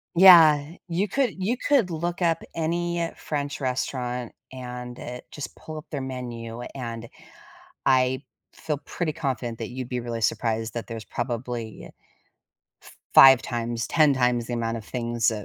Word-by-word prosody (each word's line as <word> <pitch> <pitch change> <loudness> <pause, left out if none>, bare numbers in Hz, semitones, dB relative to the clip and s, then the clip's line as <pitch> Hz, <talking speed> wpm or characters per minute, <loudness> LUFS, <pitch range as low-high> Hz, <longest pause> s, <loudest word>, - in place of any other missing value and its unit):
Yeah, 165 -5 +8 0.2
you 180 +5 0
could 250 +2 0
you 215 +7 +1
could 265 -10 +2
look 170 +2 -3
up 165 -2 +1
any 170 +1 -1
French 145 -1 -4
restaurant, 125 -2 -2 0.2
and 125 -1 -7
it 125 0 -7
just 145 - -7
pull 155 0 -9
up 155 - -8
their 145 - -4
menu, 120 -3 -6
and 115 -3 -5 0.8
I 130 0 +3 0.3
feel 150 -2 -3
pretty 170 -3 -2
confident 125 -7 -3
that 115 - -4
you'd 125 0 -6
be 125 - -2
really 120 -1 -4
surprised 110 +1 0
that 115 - -5
there's 115 -2 -6
probably 120 -2 -4 1.0
f - - -16 0.2
five 135 -2 +10
times 120 0 -3
10 155 -3 +4
times 125 -2 +1
the 120 - -2
amount 115 -1 -1
of 110 - -7
things, 120 -1 0
uh 105 -2 -5
125 Hz, 155 wpm, -25 LUFS, 120-155 Hz, 1.0 s, five